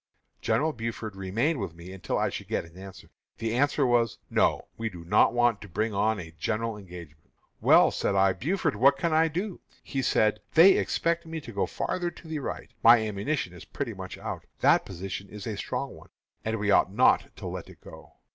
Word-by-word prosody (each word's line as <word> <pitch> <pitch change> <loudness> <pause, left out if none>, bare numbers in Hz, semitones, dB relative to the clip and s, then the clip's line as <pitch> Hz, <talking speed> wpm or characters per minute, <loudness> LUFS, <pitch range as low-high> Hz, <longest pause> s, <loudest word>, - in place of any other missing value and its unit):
General 155 +1 +1
Buford 115 -3 -5
remained 115 - -1
with 95 -5 -5
me 85 +2 -10
until 90 -4 -3
I - - +1
should - - -7
get - - -2
an 85 0 -17
answer. 95 0 -12 0.3
The 115 0 -2
answer 145 +2 +2
was, 120 -2 +2
'No; - - +2
we 115 0 -3
do 85 -4 -11
not 105 +5 +4
want 120 -3 +2
to 105 - -10
bring 110 +5 -1
on 105 +1 +1
a 80 -2 -8
general 115 +5 -1
engagement.' 85 -6 -12 0.3
'Well,' - - +6
said 100 - -1
I, 95 0 +4
'Buford, 155 - -1
what 135 +6 +5
can 165 +3 0
I 160 +1 +4
do?' 180 +4 -4 0.2
He 135 - -3
said, 110 -4 +2 0.2
'They 170 +4 +9
expect 170 -2 0
me 160 0 -4
to 120 - -9
go 100 - 0
farther 175 -1 -2
to 170 - -14
the 160 -1 -3
right; 140 - -6
my 115 +1 +8
ammunition 110 - -2
is 90 - -11
pretty - - -5
much - - -8
out. - - -6
That - - +4
position 95 +1 -6
is 105 -2 -9
a 110 - -3
strong - - -4
one, - - -16 0.3
and 110 0 -1
we 105 -1 0
ought 95 - +4
not 125 +6 +3
to - - -9
let - - -6
it - - -15
go.' - - -14
110 Hz, 210 wpm, -27 LUFS, 95-140 Hz, 0.3 s, They